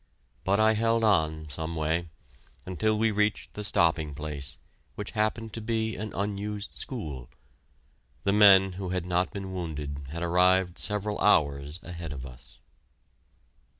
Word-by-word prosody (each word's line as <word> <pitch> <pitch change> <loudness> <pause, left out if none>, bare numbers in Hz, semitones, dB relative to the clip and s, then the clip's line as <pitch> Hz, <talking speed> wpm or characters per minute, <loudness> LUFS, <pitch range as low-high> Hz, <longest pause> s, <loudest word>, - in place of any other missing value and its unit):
But 100 +2 +2
I 110 0 +5
held 115 +1 +2
on 80 -7 +2
some 80 +3 -4
way, 80 +2 -1 0.6
until 105 +4 0
we 110 +1 +2
reached 105 0 0
the 105 - -5
stopping 80 -6 +1
place, 75 -2 -5 0.4
which - - -5
happened 110 +1 -1
to 115 - -5
be 110 0 -1
an 110 0 -5
unused 105 +1 -3
school. 75 - -6 0.9
The 100 - +2
men 95 -2 +7
who 95 0 -5
had 90 -1 -2
not 90 0 +1
been 95 -2 -6
wounded 75 -5 -5
had 85 +4 -4
arrived 90 0 +3
several 105 +3 -2
hours 75 -4 +2
ahead 85 -3 -6
of 65 -2 -7
us. 65 -2 -13
95 Hz, 145 wpm, -28 LUFS, 80-105 Hz, 0.9 s, men